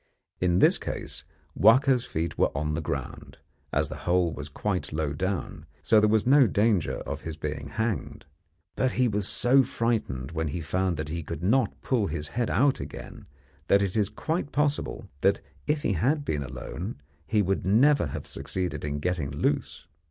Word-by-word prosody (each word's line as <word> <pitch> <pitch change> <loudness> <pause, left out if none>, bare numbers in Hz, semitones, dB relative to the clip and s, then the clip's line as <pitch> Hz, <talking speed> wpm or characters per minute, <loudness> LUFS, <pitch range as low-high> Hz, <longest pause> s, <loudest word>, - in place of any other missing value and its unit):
In 90 -1 +2
this - - +5
case - - -5 0.3
Wahka's 125 +4 +5
feet 80 +2 -3
were - - +3
on 75 +1 -1
the 80 - -1
ground, 75 - -5 0.3
as - - +1
the - - -6
hole 90 -2 +3
was 75 0 -5
quite 95 +5 -2
low 75 -1 -1
down, 90 -2 -3 0.2
so 110 +6 +5
there 105 0 +4
was 110 -1 +2
no 135 0 +6
danger 105 -3 +1
of - - -5
his 80 -2 -6
being 75 -2 -4
hanged; 110 +7 -3 0.5
but 130 -1 +1
he 125 -1 +3
was 105 -3 -1
so 120 +4 +4
frightened 115 - -1
when 80 -1 -2
he 75 +4 -3
found 90 +2 -1
that 75 0 -4
he 85 +1 -3
could 80 +1 -6
not 115 +4 +2
pull 115 -6 +1
his 75 -4 -4
head 120 -1 -1
out 140 +2 +3
again - - -8 0.4
that 100 0 +4
it 95 0 -2
is 105 -2 +2
quite 160 -2 -3
possible 145 +1 -1
that - - +3 0.3
if 150 0 0
he 100 - +1
had 140 - +1
been 75 -2 -1
alone 70 - -6 0.3
he 105 +3 +2
never 105 - +3
would - - -5
have - - -6
succeeded 90 -2 -4
in 75 -1 -2
getting 85 -2 -1
loose. 70 0 -1
95 Hz, 180 wpm, -27 LUFS, 80-120 Hz, 0.5 s, no